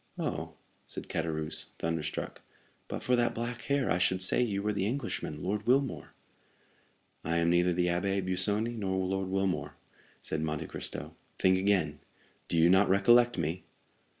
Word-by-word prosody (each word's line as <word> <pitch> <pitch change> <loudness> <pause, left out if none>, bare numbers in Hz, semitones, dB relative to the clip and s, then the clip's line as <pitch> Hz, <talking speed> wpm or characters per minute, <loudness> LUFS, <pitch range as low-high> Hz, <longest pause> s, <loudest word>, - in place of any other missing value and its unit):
"Oh?" - - -3 0.3
said - - -6
Caderousse, 80 -1 -2
thunderstruck, 80 -2 -3 0.5
"but - - -5
for 125 - +3
that 120 0 +1
black 120 +1 -3
hair, 140 -2 +1
I 90 - +2
should 95 +1 +2
say 95 - +3
you 100 -5 0
were 105 0 0
the 100 -1 0
Englishman, 115 - -3
Lord 105 +4 -2
Wilmore." 135 +1 +1 1.1
"I 85 0 0
am 85 0 +3
neither 90 +1 +3
the 90 0 +1
Abbé 95 +2 0
Busoni 105 +5 0
nor 95 -4 -1
Lord 95 0 -1
Wilmore," 95 -1 -1 0.4
said 80 - -3
Monte 80 0 -2
Cristo; - - -5 0.2
"think 95 0 +4
again,—do 85 -4 -2
you 80 +1 +6
not 95 +3 +5
recollect 120 +5 +5
me?" 85 +2 -2
95 Hz, 150 wpm, -30 LUFS, 85-105 Hz, 1.1 s, you